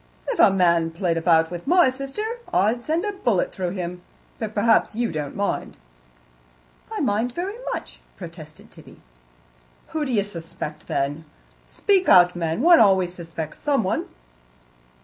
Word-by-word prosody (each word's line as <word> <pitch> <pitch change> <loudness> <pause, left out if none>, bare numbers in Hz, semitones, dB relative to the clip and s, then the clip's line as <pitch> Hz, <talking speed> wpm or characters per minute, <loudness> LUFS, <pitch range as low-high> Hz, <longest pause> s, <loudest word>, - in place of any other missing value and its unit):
"If - - -2
a - - +8
man 170 -3 +2
played 165 0 -1
about 165 -1 +3
with 175 +5 -7
my 350 -5 +5
sister, 275 +9 -5 0.3
I'd 215 +6 +2
send 320 - -1
a 415 - -1
bullet 240 - 0
through 185 -2 -3
him, 180 -1 -5 0.4
but 215 -2 -5
perhaps 225 0 +3
you 235 0 -1
don't 150 -3 -5
mind." 200 0 -3 1.1
"I - - -3
mind 225 +4 0
very 380 - -4
much," - - -6 0.2
protested 165 -4 -11
Tibby. - - -15 0.9
"Who 315 -1 -2
d'ye 240 -8 +1
suspect, 165 -5 -7
then? 145 +3 -2 0.4
Speak 385 -3 +1
out, 180 0 +6
man. 165 +3 -2
One 340 +1 +7
always 190 -4 +4
suspects 165 -3 -7
someone." 275 -10 0
190 Hz, 145 wpm, -23 LUFS, 170-255 Hz, 1.1 s, a